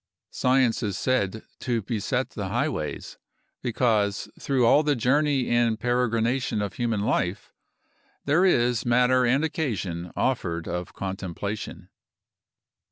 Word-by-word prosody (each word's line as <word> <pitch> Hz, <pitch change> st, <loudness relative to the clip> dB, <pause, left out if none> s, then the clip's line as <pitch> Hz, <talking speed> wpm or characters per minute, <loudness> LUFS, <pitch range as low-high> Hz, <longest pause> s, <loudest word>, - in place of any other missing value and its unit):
Science 130 Hz, -2 st, +2 dB
is 100 Hz, -4 st, -2 dB
said 110 Hz, -5 st, 0 dB, 0.2 s
to 120 Hz, -4 st, -1 dB
beset 110 Hz, -1 st, -2 dB
the -, -, -4 dB
highways, -, -, -3 dB, 0.4 s
because 110 Hz, -4 st, +1 dB
through 130 Hz, -3 st, +1 dB
all 145 Hz, -, +6 dB
the 150 Hz, -1 st, +1 dB
journey 135 Hz, +2 st, +2 dB
and 120 Hz, -2 st, +2 dB
peregrination 120 Hz, 0 st, 0 dB
of 100 Hz, -2 st, -2 dB
human 115 Hz, -4 st, -1 dB
life 95 Hz, -2 st, -1 dB, 0.7 s
there 150 Hz, +6 st, +3 dB
is 120 Hz, -10 st, +3 dB
matter 125 Hz, +1 st, +3 dB
and 135 Hz, +5 st, +2 dB
occasion 100 Hz, -, -3 dB
offered 85 Hz, -10 st, -1 dB
of 90 Hz, 0 st, -4 dB
contemplation. 95 Hz, +2 st, -5 dB
120 Hz, 115 wpm, -25 LUFS, 100-130 Hz, 0.7 s, all